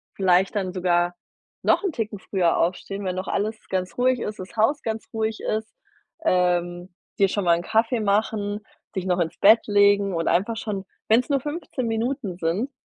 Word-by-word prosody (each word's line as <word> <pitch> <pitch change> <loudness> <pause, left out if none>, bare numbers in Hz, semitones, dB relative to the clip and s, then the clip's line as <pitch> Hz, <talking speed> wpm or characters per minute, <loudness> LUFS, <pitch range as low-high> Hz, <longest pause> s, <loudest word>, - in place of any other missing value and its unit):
vielleicht 190 +1 +3
dann 185 -2 -2
sogar 175 -1 +1 0.5
noch - - +3
'n 390 - 0
Ticken 215 -3 -3
früher 180 -4 +1
aufstehen, 195 +3 -2
wenn 185 -1 -1
noch 185 +1 -4
alles 215 +2 -1
ganz 185 -2 -2
ruhig 250 0 +2
ist, 210 -1 -5
das 185 +4 -9
Haus 275 +7 +2
ganz 220 -1 -3
ruhig 220 0 -1
ist, 215 0 -2 0.5
ähm, 175 - +1 0.3
dir 195 -1 +5
schon 200 0 -1
mal 170 -1 +5
'n 170 - -5
Kaffee 225 +4 +1
machen, 205 0 0 0.4
dich 185 - -2
noch 180 -1 +1
ins 165 -2 -1
Bett 220 +3 +6
legen 200 -1 +4
und 165 - -1
einfach 200 +7 +1
schon, 210 -3 -4 0.3
wenn's 235 +5 +4
nur 280 -1 +2
15 295 -4 -4
Minuten 225 -2 -2
sind, 185 +10 -1
200 Hz, 180 wpm, -24 LUFS, 180-225 Hz, 0.5 s, Bett